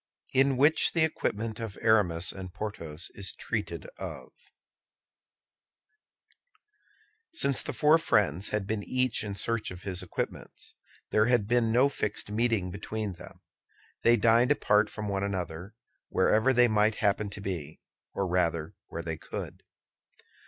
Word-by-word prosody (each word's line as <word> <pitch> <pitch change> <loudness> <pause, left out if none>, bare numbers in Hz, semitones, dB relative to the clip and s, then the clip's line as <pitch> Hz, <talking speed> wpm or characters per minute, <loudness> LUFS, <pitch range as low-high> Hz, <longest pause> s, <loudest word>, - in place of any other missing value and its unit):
IN 135 0 +3
WHICH 150 +4 +4
THE 165 - +3
EQUIPMENT 115 -8 -2
OF 110 -4 -6
ARAMIS 95 -6 +3
AND 95 -1 -9
PORTHOS 90 -6 -5
IS 100 -1 -4
TREATED - - -4
OF - - -7 3.0
Since 140 - +3
the - - -4
four 150 +5 +4
friends 100 - +1
had 105 -2 -2
been 105 +1 -2
each 130 +1 0
in 100 -2 -4
search 115 +2 -1
of 90 0 -9
his 95 -2 -1
equipments, 90 - -6 0.4
there 110 +1 +3
had 120 -5 +2
been 120 -1 +2
no 125 +4 +5
fixed 105 -6 -3
meeting 110 -4 0
between 105 +1 -4
them. 85 - -13 0.6
They 120 +1 +5
dined 115 +3 +4
apart 105 -6 +3
from 105 -1 -5
one 100 -1 -1
another, 95 0 -4 0.3
wherever 110 +7 +3
they 125 -1 +5
might 110 0 +2
happen 105 +1 0
to 100 - -8
be, 85 -6 -5 0.3
or 100 - -2
rather 85 -3 0
where 85 - -6
they 80 -1 -4
could. - - -7
105 Hz, 140 wpm, -29 LUFS, 95-115 Hz, 3.0 s, no